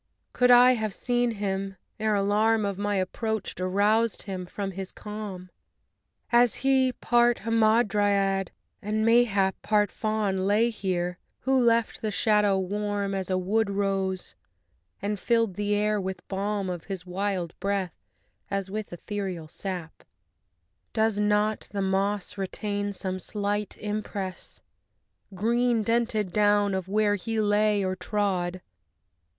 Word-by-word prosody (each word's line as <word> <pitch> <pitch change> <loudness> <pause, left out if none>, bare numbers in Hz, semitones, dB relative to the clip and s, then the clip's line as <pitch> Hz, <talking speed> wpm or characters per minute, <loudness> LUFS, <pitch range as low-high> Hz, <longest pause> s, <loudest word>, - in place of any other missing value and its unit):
could 250 0 +3
I 245 +1 +8
have 220 -5 -1
seen 245 -1 +1
him 195 -3 -3 0.2
ere 215 -1 +1
alarm 210 +2 +2
Of 200 -1 -3
my 205 0 0
approach 215 +3 -2
aroused 205 +5 +1
him 185 -3 -5
from 195 +1 -4
his 190 0 -6
calm! 205 -4 -7 0.8
As 240 -1 +5
he, 265 -1 +4
part 240 -1 +2
Hamadryad 205 -4 +2 0.3
and, 215 +1 -1
mayhap, 220 -5 +3
Part 210 -2 +2
Faun, 215 -3 -1
lay 205 +5 +2
here; 180 -4 -2 0.2
who 265 -1 +2
left 230 -1 +2
the 220 - -1
shadow 210 -2 +3
warm 200 +1 -2
As 190 -1 -3
a 185 - +1
wood 200 +4 +1
rose, 195 -2 -1 0.7
and 205 0 -1
filled 230 -3 +1
the 205 +2 0
air 210 0 +1
with 190 -1 -5
balm 200 0 -2
Of 175 -3 -5
his 190 -2 -6
wild 185 -2 -2
breath 195 -2 -2 0.5
as 195 -1 -3
with 215 0 -4
ethereal 185 -2 -5
sap. 175 -1 -5
II - - -27 0.9
Does 220 -2 +1
not 210 +1 +1
the 200 -1 -3
moss 195 +1 -1
retain 205 +1 -2
some 185 -1 -4
slight 205 +1 -3
impress, 205 -3 -5 0.7
Green 235 +3 +2
dented 225 -4 0
down, 205 -1 +3
of 190 -1 -2
where 210 +1 +2
he 225 +2 -2
lay 210 -1 +2
or 185 0 -1
trod? 185 -3 -1
205 Hz, 135 wpm, -27 LUFS, 190-215 Hz, 0.9 s, I